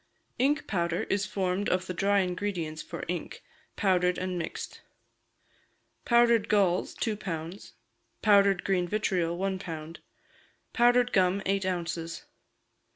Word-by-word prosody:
Ink 280 Hz, +4 st, +2 dB
powder 170 Hz, -3 st, -1 dB
is 200 Hz, 0 st, +1 dB
formed 190 Hz, +1 st, -1 dB
of 185 Hz, 0 st, 0 dB
the 185 Hz, -, -4 dB
dry 200 Hz, +2 st, +2 dB
ingredients 180 Hz, -4 st, -3 dB
for -, -, -7 dB
ink, 175 Hz, 0 st, -5 dB, 0.3 s
powdered 180 Hz, -3 st, +2 dB
and 185 Hz, 0 st, -3 dB
mixed. 165 Hz, -, -6 dB, 1.2 s
Powdered 235 Hz, -2 st, +4 dB
galls, 190 Hz, -4 st, +2 dB
two 220 Hz, -2 st, -1 dB
pounds; 175 Hz, -2 st, -6 dB, 0.5 s
powdered 200 Hz, -3 st, +5 dB
green 180 Hz, -2 st, +1 dB
vitriol, 175 Hz, -4 st, 0 dB
one 190 Hz, 0 st, -1 dB
pound; 165 Hz, -2 st, -7 dB, 0.7 s
powdered 245 Hz, 0 st, +4 dB
gum, 190 Hz, +1 st, +2 dB
eight 195 Hz, -1 st, 0 dB
ounces. 170 Hz, -2 st, -3 dB
185 Hz, 120 wpm, -28 LUFS, 175-205 Hz, 1.2 s, powdered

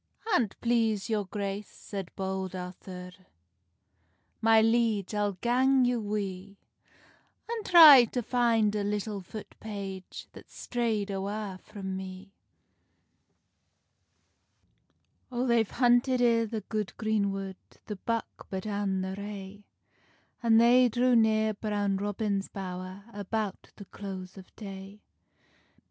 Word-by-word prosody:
"An't 230 Hz, -, +1 dB
please 225 Hz, -3 st, +1 dB
your 210 Hz, -2 st, 0 dB
grace," 200 Hz, +1 st, -4 dB
said 195 Hz, -4 st, -7 dB
Bold 190 Hz, -1 st, -3 dB
Arthur, 180 Hz, 0 st, -8 dB, 1.3 s
"My 225 Hz, 0 st, +6 dB
liege, 225 Hz, -3 st, +2 dB
I'll 205 Hz, -1 st, 0 dB
gang 255 Hz, +6 st, +3 dB
you 245 Hz, -1 st, +1 dB
wi, 200 Hz, -2 st, -4 dB, 0.9 s
An 460 Hz, -1 st, -3 dB
try 310 Hz, -10 st, +10 dB
to 245 Hz, +2 st, -3 dB
fin 230 Hz, -3 st, +2 dB
a 205 Hz, -, 0 dB
little 205 Hz, 0 st, -2 dB
foot 210 Hz, +4 st, -9 dB
page, 195 Hz, -3 st, -7 dB
That's -, -, -14 dB
strayd 225 Hz, -4 st, -1 dB
awa 195 Hz, 0 st, -4 dB
frae 210 Hz, -2 st, -10 dB
me." 190 Hz, +1 st, -6 dB, 3.0 s
O 245 Hz, 0 st, -1 dB
they've 235 Hz, -4 st, +2 dB
hunted 245 Hz, +1 st, +3 dB
i 230 Hz, -2 st, +3 dB
the 220 Hz, 0 st, -4 dB
good 210 Hz, -2 st, -4 dB
green 215 Hz, -3 st, +1 dB
wood 195 Hz, -1 st, -5 dB, 0.3 s
The 210 Hz, -, -6 dB
buck 230 Hz, +3 st, -4 dB
but 190 Hz, 0 st, -4 dB
an 200 Hz, -2 st, -1 dB
the 190 Hz, 0 st, -3 dB
rae, 200 Hz, 0 st, -8 dB, 0.8 s
An 230 Hz, -2 st, +4 dB
they 245 Hz, +2 st, +6 dB
drew 245 Hz, +2 st, +3 dB
near 220 Hz, -1 st, +3 dB
Brown 205 Hz, -2 st, -1 dB
Robin's 205 Hz, 0 st, -2 dB
bowr, 185 Hz, 0 st, -7 dB
About 205 Hz, 0 st, -4 dB
the 200 Hz, -, -11 dB
close 190 Hz, -2 st, -8 dB
of 190 Hz, -2 st, -13 dB
day. 195 Hz, 0 st, -9 dB
205 Hz, 120 wpm, -29 LUFS, 195-230 Hz, 3.0 s, try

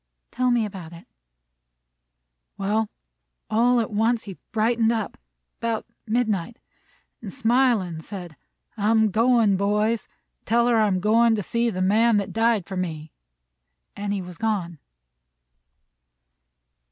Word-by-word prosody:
"Tell 255 Hz, +1 st, +1 dB
me 240 Hz, -2 st, +2 dB
about 185 Hz, -5 st, -8 dB
it." 170 Hz, -, -13 dB, 1.5 s
"Well, 210 Hz, +2 st, 0 dB, 0.6 s
all 240 Hz, +3 st, +3 dB
at 225 Hz, -, -2 dB
once 225 Hz, +2 st, +1 dB
he 195 Hz, -3 st, -9 dB
brightened 225 Hz, +1 st, +2 dB
up, 220 Hz, -3 st, -2 dB, 0.4 s
'bout 230 Hz, -1 st, -2 dB, 0.2 s
midnight, 220 Hz, -2 st, -1 dB, 0.6 s
an' 215 Hz, -, -7 dB
smilin', 225 Hz, -7 st, +1 dB
said: 175 Hz, -3 st, -8 dB, 0.4 s
'I'm 220 Hz, 0 st, +3 dB
goin', 225 Hz, -2 st, +3 dB
boys. 210 Hz, +3 st, 0 dB, 0.4 s
Tell 235 Hz, +2 st, +2 dB
her 240 Hz, -1 st, +3 dB
I'm 205 Hz, -4 st, +2 dB
going 225 Hz, +3 st, +4 dB
to 205 Hz, -, -3 dB
see 235 Hz, +5 st, 0 dB
the 185 Hz, -4 st, -2 dB
Man 220 Hz, +3 st, +4 dB
that 200 Hz, -2 st, -2 dB
died 225 Hz, -4 st, +2 dB
for 190 Hz, -, -7 dB
me;' 160 Hz, -4 st, -4 dB, 0.8 s
an' 205 Hz, 0 st, -3 dB
he 200 Hz, -2 st, -2 dB
was 180 Hz, -2 st, -11 dB
gone." 190 Hz, -8 st, -2 dB
215 Hz, 125 wpm, -24 LUFS, 195-230 Hz, 1.5 s, going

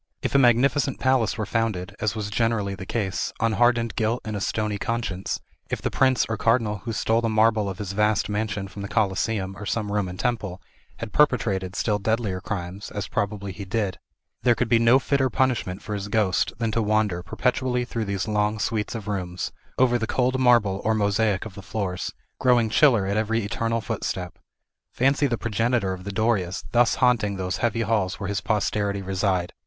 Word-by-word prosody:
If -, -, -1 dB
a 140 Hz, -, +5 dB
magnificent 130 Hz, +2 st, +3 dB
palace 130 Hz, -5 st, +2 dB
were 110 Hz, -, -1 dB
founded, 105 Hz, -4 st, -2 dB
as 110 Hz, 0 st, 0 dB
was 105 Hz, -1 st, -4 dB
generally 110 Hz, -3 st, 0 dB
the 95 Hz, 0 st, -8 dB
case, 95 Hz, -6 st, -2 dB
on 115 Hz, 0 st, +2 dB
hardened 115 Hz, +1 st, +2 dB
guilt 115 Hz, +2 st, 0 dB
and 110 Hz, -1 st, -3 dB
a 100 Hz, -, -3 dB
stony 105 Hz, 0 st, -1 dB
conscience, 105 Hz, -5 st, -2 dB, 0.3 s
if -, -, -2 dB
the -, -, -2 dB
prince 130 Hz, -1 st, +3 dB
or 110 Hz, -, -2 dB
cardinal 115 Hz, -2 st, +2 dB
who 110 Hz, +5 st, -6 dB
stole 110 Hz, +1 st, +1 dB
the 115 Hz, -, 0 dB
marble 110 Hz, -1 st, +3 dB
of 95 Hz, -, -6 dB
his 100 Hz, -1 st, -4 dB
vast 105 Hz, +1 st, +2 dB
mansion 105 Hz, -1 st, -2 dB
from 100 Hz, +1 st, -9 dB
the 100 Hz, -, -4 dB
Coliseum, 100 Hz, -1 st, 0 dB
or 105 Hz, -, -6 dB
some 105 Hz, -1 st, -1 dB
Roman 95 Hz, -3 st, -1 dB
temple, 105 Hz, -7 st, -2 dB, 0.4 s
had 115 Hz, -3 st, -7 dB
perpetrated 100 Hz, -10 st, +2 dB
still 105 Hz, +1 st, 0 dB
deadlier 105 Hz, -3 st, -1 dB
crimes, 95 Hz, 0 st, -5 dB
as 105 Hz, -, -4 dB
probably 100 Hz, -1 st, -2 dB
he 100 Hz, +2 st, -7 dB
did, 100 Hz, -1 st, -2 dB, 0.4 s
there 120 Hz, -1 st, +4 dB
could 120 Hz, -, 0 dB
be 115 Hz, -, +5 dB
no 115 Hz, +2 st, +6 dB
fitter 135 Hz, -1 st, +1 dB
punishment 120 Hz, -8 st, 0 dB
for 105 Hz, -, -5 dB
his 100 Hz, 0 st, -3 dB
ghost 100 Hz, -5 st, +1 dB
than 115 Hz, -2 st, -1 dB
to 115 Hz, -, +1 dB
wander, 105 Hz, -4 st, +1 dB
perpetually 125 Hz, +6 st, 0 dB
through 115 Hz, -2 st, -3 dB
these 100 Hz, 0 st, -2 dB
long 105 Hz, 0 st, +1 dB
suites 105 Hz, +1 st, -2 dB
of 110 Hz, -2 st, -6 dB
rooms, 90 Hz, -3 st, -3 dB, 0.3 s
over 120 Hz, -2 st, +3 dB
the 110 Hz, -, -2 dB
cold 130 Hz, +2 st, +1 dB
marble 115 Hz, -6 st, +4 dB
or 110 Hz, 0 st, +2 dB
mosaic 105 Hz, -1 st, +1 dB
of 110 Hz, -, -8 dB
the 100 Hz, -, -9 dB
floors, 95 Hz, -3 st, -3 dB, 0.3 s
growing 120 Hz, -3 st, +3 dB
chiller 120 Hz, -7 st, +5 dB
at 100 Hz, +2 st, -1 dB
every 110 Hz, +1 st, 0 dB
eternal 115 Hz, +3 st, -1 dB
footstep. 100 Hz, -5 st, -4 dB, 0.5 s
Fancy 140 Hz, +3 st, +2 dB
the 120 Hz, -3 st, -1 dB
progenitor 115 Hz, -2 st, 0 dB
of 90 Hz, 0 st, -8 dB
the 100 Hz, -, -3 dB
Dorias 100 Hz, -3 st, 0 dB
thus 120 Hz, -1 st, +4 dB
haunting 115 Hz, -5 st, +2 dB
those 95 Hz, -1 st, -2 dB
heavy 115 Hz, -1 st, 0 dB
halls 105 Hz, -4 st, 0 dB
where 100 Hz, -, -3 dB
his 100 Hz, 0 st, -1 dB
posterity 100 Hz, -2 st, 0 dB
reside! 95 Hz, -2 st, 0 dB
110 Hz, 195 wpm, -24 LUFS, 100-115 Hz, 0.5 s, no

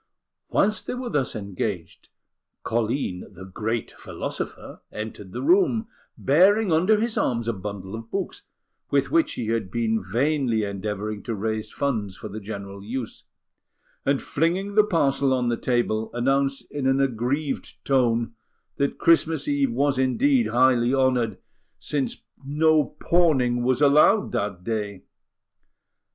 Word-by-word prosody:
Whilst 215 Hz, +2 st, +1 dB
they -, -, -2 dB
were 250 Hz, -1 st, -5 dB
thus 140 Hz, -7 st, 0 dB
engaged, 100 Hz, -3 st, -5 dB, 0.5 s
Colline, 115 Hz, -4 st, -2 dB
the 95 Hz, -1 st, -11 dB
"great" 110 Hz, +4 st, -3 dB
philosopher, -, -, -6 dB
entered 105 Hz, -3 st, -7 dB
the -, -, -5 dB
room, 295 Hz, -, +3 dB, 0.3 s
bearing 190 Hz, +8 st, +4 dB
under 185 Hz, +7 st, +4 dB
his 230 Hz, 0 st, -1 dB
arms 115 Hz, -2 st, 0 dB
a 115 Hz, -, +1 dB
bundle 95 Hz, -1 st, -7 dB
of 115 Hz, 0 st, -7 dB
books, 195 Hz, -, -4 dB, 0.5 s
with -, -, +1 dB
which 330 Hz, 0 st, +3 dB
he 115 Hz, -2 st, -4 dB
had 115 Hz, -4 st, -1 dB
been 110 Hz, +1 st, 0 dB
vainly 120 Hz, +2 st, +1 dB
endeavouring 105 Hz, +1 st, -4 dB
to 115 Hz, -, -4 dB
raise 110 Hz, +1 st, -3 dB
funds 110 Hz, -9 st, -2 dB
for 110 Hz, -, -7 dB
the 105 Hz, +2 st, -6 dB
general 100 Hz, -1 st, -7 dB
use; 120 Hz, +2 st, -6 dB, 0.8 s
and, 140 Hz, 0 st, +1 dB
flinging 180 Hz, +6 st, 0 dB
the 215 Hz, +1 st, +6 dB
parcel 140 Hz, -8 st, +2 dB
on 125 Hz, -1 st, 0 dB
the 120 Hz, -, +1 dB
table, 115 Hz, -3 st, 0 dB
announced 135 Hz, +2 st, +1 dB
in 140 Hz, -2 st, -2 dB
an 135 Hz, 0 st, +3 dB
aggrieved 135 Hz, +3 st, -1 dB
tone 120 Hz, -4 st, +2 dB, 0.4 s
that 140 Hz, 0 st, 0 dB
Christmas 165 Hz, -3 st, +3 dB
Eve 140 Hz, -3 st, +1 dB
was 135 Hz, +2 st, +1 dB
indeed 240 Hz, -, +3 dB
highly 125 Hz, 0 st, +3 dB
honoured, 125 Hz, -6 st, +1 dB, 0.4 s
since 140 Hz, -3 st, -3 dB, 0.2 s
no 155 Hz, +2 st, +3 dB
pawning 135 Hz, -9 st, +2 dB
was 130 Hz, +3 st, +2 dB
allowed 150 Hz, +9 st, +5 dB
that 100 Hz, -3 st, -2 dB
day! 105 Hz, -3 st, -3 dB
125 Hz, 140 wpm, -24 LUFS, 110-145 Hz, 0.8 s, the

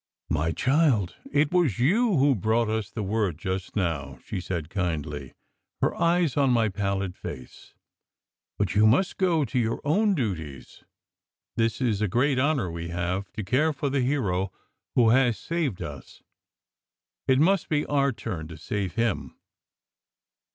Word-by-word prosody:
"My 80 Hz, +2 st, +1 dB
child, 130 Hz, -, +2 dB, 0.2 s
it 145 Hz, +1 st, +2 dB
was 175 Hz, -, +2 dB
you 195 Hz, -, +3 dB
who 140 Hz, +1 st, +4 dB
brought 110 Hz, +1 st, +1 dB
us 110 Hz, -1 st, -2 dB
the 105 Hz, 0 st, -4 dB
word 100 Hz, -5 st, 0 dB
just 95 Hz, +2 st, -4 dB
now!" 75 Hz, -, -2 dB
she 90 Hz, -, -4 dB
said 85 Hz, -4 st, -4 dB
kindly, 75 Hz, -7 st, -3 dB, 0.4 s
her -, -, +1 dB
eyes 170 Hz, -4 st, +2 dB
on 140 Hz, -2 st, +3 dB
my 115 Hz, -3 st, +3 dB
pallid 100 Hz, -2 st, -2 dB
face. 65 Hz, -1 st, -9 dB, 0.8 s
"But 100 Hz, -4 st, 0 dB
you 105 Hz, +2 st, +5 dB
must 140 Hz, -, +2 dB
go 170 Hz, -6 st, +2 dB
to 130 Hz, -, -1 dB
your 115 Hz, -1 st, 0 dB
own 200 Hz, +7 st, +2 dB
duties. 80 Hz, -, -5 dB, 0.7 s
This 115 Hz, -1 st, 0 dB
is 115 Hz, -6 st, 0 dB
a 105 Hz, -, +2 dB
great 130 Hz, +7 st, +2 dB
honour 135 Hz, -, +1 dB
we 85 Hz, 0 st, -5 dB
have, 90 Hz, +3 st, -3 dB
to 110 Hz, -, -4 dB
care 150 Hz, +10 st, +2 dB
for 145 Hz, -1 st, -2 dB
the 135 Hz, -1 st, +1 dB
hero 100 Hz, -9 st, 0 dB, 0.4 s
who 120 Hz, -3 st, +5 dB
has 125 Hz, -2 st, +3 dB
saved 160 Hz, -, -2 dB
us. -, -, -9 dB, 1.0 s
It 130 Hz, -, +4 dB
must 180 Hz, +6 st, +3 dB
be 150 Hz, -1 st, +1 dB
our 140 Hz, -1 st, +2 dB
turn 90 Hz, -9 st, -5 dB
to 80 Hz, 0 st, -10 dB
save 95 Hz, +2 st, -3 dB
him. 115 Hz, -3 st, -1 dB
110 Hz, 155 wpm, -26 LUFS, 90-140 Hz, 1.0 s, you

